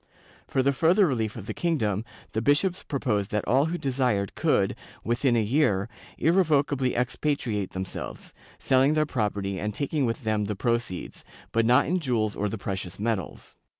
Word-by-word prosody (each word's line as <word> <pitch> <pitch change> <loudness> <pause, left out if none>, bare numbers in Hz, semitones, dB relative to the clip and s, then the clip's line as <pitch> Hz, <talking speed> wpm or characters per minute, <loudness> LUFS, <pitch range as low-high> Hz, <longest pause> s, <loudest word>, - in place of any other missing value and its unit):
For 130 - +1
the 140 +1 +3
further 170 +8 +4
relief 115 - -1
of 110 -5 -7
the 110 - -4
kingdom, 110 - 0 0.3
the 110 - -1
bishops 155 - +2
proposed 110 -9 -1
that 105 -1 -2
all 135 +4 +4
who 170 +2 -2
desired 125 - 0
could, - - +1 0.3
within 120 +2 +1
a 115 - +3
year, 105 -4 +2 0.3
irrevocably 145 -6 +2
expatriate 125 -5 -1
themselves, 95 0 -6 0.2
selling 135 +3 +3
their 155 0 +3
property 100 -7 -2
and 105 +2 -3
taking 140 -2 0
with 115 +3 -3
them 110 -1 0
the 105 0 -3
proceeds, 115 -4 -2 0.3
but 115 0 +2
not 125 +1 +5
in 180 +4 0
jewels 115 -8 0
or 105 0 -1
the 110 - -4
precious 95 -3 -5
metals. 105 - -3
120 Hz, 165 wpm, -26 LUFS, 105-140 Hz, 0.3 s, not